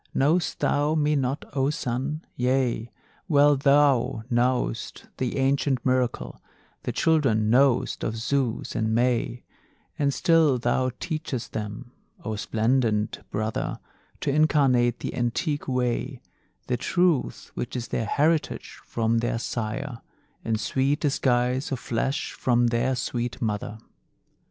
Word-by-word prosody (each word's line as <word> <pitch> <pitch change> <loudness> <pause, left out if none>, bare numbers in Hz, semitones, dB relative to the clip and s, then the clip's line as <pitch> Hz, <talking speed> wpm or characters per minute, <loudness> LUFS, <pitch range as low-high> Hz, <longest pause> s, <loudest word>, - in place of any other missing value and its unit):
Know'st 155 +5 +1
thou 145 +2 +2
me 150 -1 +2
not, 135 +1 -1
O 135 0 +1
Sun? 140 +2 -3
Yea, 125 -2 0 0.4
well 145 -3 +5
Thou 140 -5 +3
know'st 120 - 0
the 130 0 -2
ancient 135 -1 +1
miracle, 130 -2 0 0.4
The - - -3
children 125 -10 +2
know'st 130 0 +3
of 110 - -2
Zeus 120 0 -1
and 110 0 0
May; 120 0 0 0.6
And 140 -1 +2
still 160 -3 +3
thou 125 +2 +1
teachest 155 -7 -4
them, 105 +2 -5 0.3
O 110 - -2
splendent 110 0 0
Brother, 110 +1 -2 0.4
To - - 0
incarnate, 135 -5 +3
the - - -4
antique 125 +5 -1
way, 125 +1 -1 0.5
The 125 - -1
truth 175 +2 0
which 120 - -5
is 120 -1 -4
their 115 - -1
heritage 155 +5 0
from 115 0 0
their 115 0 -1
Sire 120 +3 -4 0.4
In 110 -1 0
sweet 130 +7 0
disguise 130 -2 +1
of 135 - 0
flesh 125 +4 -2
from 120 -1 +1
their 120 +3 +1
sweet 120 0 -3
Mother. 105 -1 -3
125 Hz, 125 wpm, -25 LUFS, 115-140 Hz, 0.6 s, well